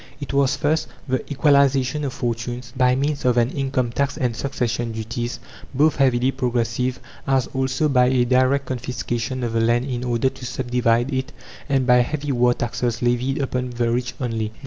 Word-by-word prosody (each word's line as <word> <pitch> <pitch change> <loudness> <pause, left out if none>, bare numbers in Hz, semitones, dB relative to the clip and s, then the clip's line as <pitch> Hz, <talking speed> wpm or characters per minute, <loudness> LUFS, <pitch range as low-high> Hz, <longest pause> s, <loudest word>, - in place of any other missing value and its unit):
It 140 -1 -6
was, 140 -1 +2
first, 155 +2 0 0.2
the 130 -1 0
equalization 140 -1 +3
of 135 - -2
fortunes, 120 0 -4
by 125 -1 +3
means 140 +2 -1
of 125 -1 +2
an 120 +1 +3
income 135 -3 -1
tax 140 +3 -1
and 125 -6 -1
succession 120 -3 -2
duties, 115 +2 -4 0.4
both 150 +4 +3
heavily 130 -1 +3
progressive, 125 0 -1 0.3
as 135 -2 +2
also 130 +3 0
by 125 -3 +4
a 125 -1 +3
direct 130 +2 +2
confiscation 125 0 -3
of 115 -1 -2
the 115 - +2
land 120 +2 +2
in 125 -3 -3
order 120 +1 +1
to 130 -1 -14
sub 125 0 -4
divide 120 +1 +2
it, 130 0 -2 0.4
and 135 -2 +2
by 125 -1 +5
heavy 145 +4 0
war 120 -1 +3
taxes 120 0 -2
levied 125 +4 +1
upon 125 -1 -2
the 120 -1 -1
rich 125 +1 -2
only. 115 -3 -2
125 Hz, 180 wpm, -22 LUFS, 120-135 Hz, 0.4 s, by